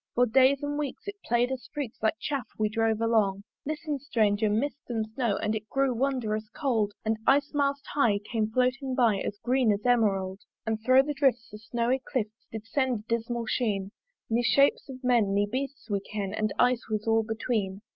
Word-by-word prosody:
For 245 - +5
days 265 +4 +4
and 290 0 -2
weeks 290 +6 -5
it 405 0 -5
play'd 240 +2 +1
us 260 -1 -5
freaks 285 -6 -5
Like 220 +5 +2
Chaff 275 -6 -3
we 215 -1 +1
drove 225 0 0
along. 210 -4 +2 0.2
Listen, 300 -1 -3
Stranger! 215 -6 +1
Mist 265 +7 -1
and 225 -2 -1
Snow, 230 -5 0
And 215 - -1
it 215 -1 -5
grew 270 -1 +1
wond'rous 230 -4 -1
cauld: 220 -5 0
And 220 0 +1
Ice 285 +1 +4
mast 280 -1 0
high 230 -8 +3
came 215 +1 -2
floating 255 +3 0
by 230 -6 +3
As 205 - -4
green 250 -2 +3
as 205 0 -1
Emerauld. 195 -6 +2 0.3
And 220 -1 -1
thro' 255 +2 +6
the 295 +1 -3
drifts 265 -4 +1
the 210 - -9
snowy 240 +4 -1
clifts 220 -4 -4
Did 220 -1 -6
send 255 -2 0
a - - -23
dismal 235 +1 -1
sheen; 205 -4 -1 0.4
Ne 230 +1 +1
shapes 275 +4 +3
of 260 0 -9
men 235 -6 +3
ne 205 0 +3
beasts 270 +6 -4
we 200 -3 0
ken 200 -1 -5
The 215 0 -1
Ice 245 -1 +2
was 215 -1 -2
all 225 0 +3
between. 215 -3 -2
230 Hz, 195 wpm, -28 LUFS, 215-265 Hz, 0.4 s, thro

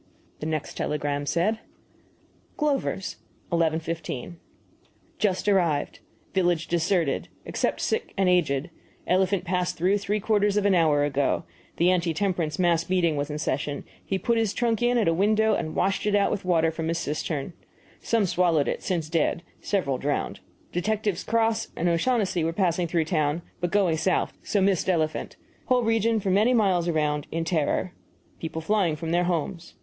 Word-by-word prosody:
The 155 - -4
next 155 -2 -3
telegram 145 -1 -2
said: 205 +8 +1 1.0
GLOVER'S, 275 -10 -1 0.3
11.15 165 -2 -1 0.9
Just 200 -1 0
arrived. 175 -7 +1 0.3
Village 175 -3 +1
deserted, 170 -3 +1 0.2
except - - -1
sick 450 +1 -1
and 190 -1 +2
aged. 170 -3 +1 0.3
Elephant 185 +1 +2
passed 180 0 -1
through 190 +5 +2
three 205 +1 -1
quarters 205 -1 +2
of 205 - +1
an 200 - +4
hour 155 -5 +3
ago. 140 +2 0 0.3
The 175 +2 +4
anti 170 -3 0
temperance 175 -6 -1
mass 170 -2 +2
meeting 175 -4 +2
was 145 +1 -2
in 150 - -3
session; 145 -1 -2 0.2
he 195 - -1
put 230 +4 +1
his 220 -3 0
trunk 235 -2 0
in 240 0 +3
at 225 - +2
a 165 - +4
window 215 +4 +3
and 155 -1 -2
washed 195 +2 0
it 205 - +2
out 200 - +3
with 195 - -3
water 165 -3 +3
from 160 0 -3
cistern. 155 0 -3 0.5
Some 225 -3 +1
swallowed 170 -5 +2
it - - -2
since 170 -5 -2
dead; 165 +1 0 0.2
several 140 -11 0
drowned. 145 +1 -2 0.3
Detectives 205 +1 -1
Cross 225 0 +1
and 170 - 0
O'Shaughnessy 185 0 +1
were 165 +1 0
passing 175 -1 +1
through 165 -1 +1
town, 155 0 0 0.2
but 175 - -1
going 180 -4 +2
south 185 +3 0
so 205 - 0
missed 190 -2 +2
elephant. 160 -3 -1 0.3
Whole 250 -1 +2
region 225 0 +2
for 195 -2 -1
many 215 +6 +4
miles 185 -6 +2
around 150 -3 0
in 165 0 -2
terror 170 +2 0 0.5
people 160 0 -5
flying 190 -4 +2
from 160 +1 -4
their 175 +1 +2
homes. 170 0 -3
175 Hz, 165 wpm, -26 LUFS, 160-200 Hz, 1.0 s, an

